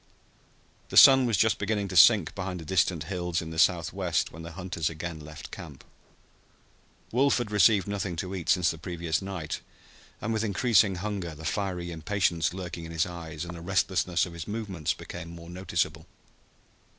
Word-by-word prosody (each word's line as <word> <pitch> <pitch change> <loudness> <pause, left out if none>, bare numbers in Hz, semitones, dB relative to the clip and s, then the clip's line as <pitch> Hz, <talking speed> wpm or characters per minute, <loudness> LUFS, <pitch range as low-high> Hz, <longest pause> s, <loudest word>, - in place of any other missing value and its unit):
The - - -1
sun 135 -2 +9
was 115 -4 +1
just 110 +1 +2
beginning 105 -1 -1
to 90 - -6
sink 90 0 +6
behind 95 -2 -4
the 80 - -9
distant 90 -2 +1
hills 90 0 -2
in 80 -1 -6
the 80 - -4
southwest 85 0 +1
when 80 - -10
the 85 0 -8
hunters 90 -3 -3
again 80 0 -6
left 75 0 -10
camp. - - -10 1.3
Wolf 135 +4 +3
had 120 -4 -3
received 105 0 +4
nothing 100 -3 -3
to 90 +3 -4
eat 90 -4 -5
since 90 -3 +3
the 80 - -9
previous 85 0 -2
night, 95 -6 -5 0.6
and 115 - -2
with 110 0 0
increasing 105 -2 +3
hunger 95 -4 -4
the 80 +2 -10
fiery 90 -2 -2
impatience 85 -1 0
lurking 90 -2 -6
in 80 - -8
his 80 -1 +1
eyes 85 -2 -7
and 85 0 -7
the 85 - -9
restlessness 90 0 +1
of 85 - -9
his 85 -1 -7
movements 105 -7 -3
became 85 -1 -8
more 85 0 -10
noticeable. 85 -2 -2
90 Hz, 175 wpm, -28 LUFS, 85-100 Hz, 1.3 s, sun